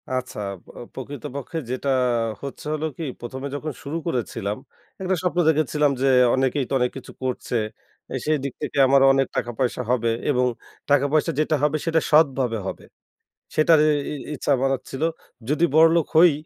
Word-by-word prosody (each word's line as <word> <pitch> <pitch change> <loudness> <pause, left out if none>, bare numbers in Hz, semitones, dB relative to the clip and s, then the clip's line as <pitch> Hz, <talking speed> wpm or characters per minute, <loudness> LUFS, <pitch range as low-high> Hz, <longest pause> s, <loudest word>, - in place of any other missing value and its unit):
আচ্ছা। 130 -3 -3
আব 95 - -11 0.2
অ - - -8 0.2
প্রকৃতপক্ষে 140 +3 -6
যেটা 130 +2 -2 0.5
হচ্ছে 140 +1 -7
হল 155 0 -3
কি 165 - -4 0.2
১ম 125 +2 -6
এ - - -6
যখন 155 +2 -4
শুরু 150 +3 -3
করেছিলাম 115 -7 -2 0.4
একটা 190 0 +1
স্বপ্ন 180 -1 0
দেখেছিলাম 150 -1 +2
যে, 135 - +3 0.3
অনেকেই 130 +1 +1
তো - - -3
অনেক 125 0 +1
কিছু 130 - -10
করছে। 130 -1 -3 0.6
এ - - -2
সেই 155 0 +2
দিক 140 -3 -3
থেকে 150 - -4
আমারও 135 0 +5
অনেক 135 -1 +2
টাকা 120 - -1
পয়সা 125 -1 0
হবে 115 -2 +1 0.2
এবং 125 -2 +2 0.5
টাকাপয়সা 145 +2 +3
যেটা 155 0 +2
হবে 150 +1 +2
সেটা 165 -1 +2
সৎভাবে 135 -6 +3
হবে। - - -6 0.7
সেটার 155 +1 +5
এ - - +5 0.2
ই - - -3 0.2
ইচ্ছা 145 - -3
আমার 135 +1 +1 0.2
ছিল। 135 - -5 0.5
যদি 155 +4 +2
বড়লোক 165 0 +5
হই 170 0 +8
140 Hz, 170 wpm, -23 LUFS, 130-155 Hz, 0.7 s, হই